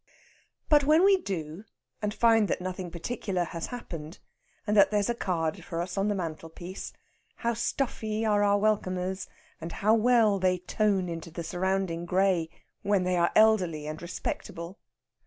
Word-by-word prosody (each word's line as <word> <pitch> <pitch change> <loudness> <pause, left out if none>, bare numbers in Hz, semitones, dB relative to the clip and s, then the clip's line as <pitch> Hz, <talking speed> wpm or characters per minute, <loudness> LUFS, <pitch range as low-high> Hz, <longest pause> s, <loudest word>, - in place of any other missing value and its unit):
But 295 -2 +5
when 310 +5 +5
we 395 -1 +6
do 175 - -5 0.4
and 210 -1 -1
find 225 -1 +4
that - - -1
nothing 185 0 -5
particular 185 +1 -3
has 165 -1 -5
happened, 170 -9 -7 0.5
and 210 0 0
that 200 - +7
there's 210 +2 +1
a - - 0
card 165 -8 -2
for 165 - -5
us 175 +1 -3
on 195 +1 +1
the 205 - +1
mantelpiece, 170 +1 -6 0.4
how 235 0 -1
stuffy 225 -2 -2
are 210 -1 +3
our 205 0 +4
welcomers, 190 -3 -1 0.3
and 165 +1 -6
how 215 +2 +2
well 225 -3 +4
they 185 0 +2
tone 190 +1 0
into 165 -1 -6
the 170 +1 -6
surrounding 180 -1 -1
grey 180 -3 +2 0.3
when 200 -2 +2
they 180 0 +1
are 170 -1 +3
elderly 185 -9 +4
and 155 +1 -6
respectable? 175 +1 -5
190 Hz, 160 wpm, -28 LUFS, 170-215 Hz, 0.5 s, that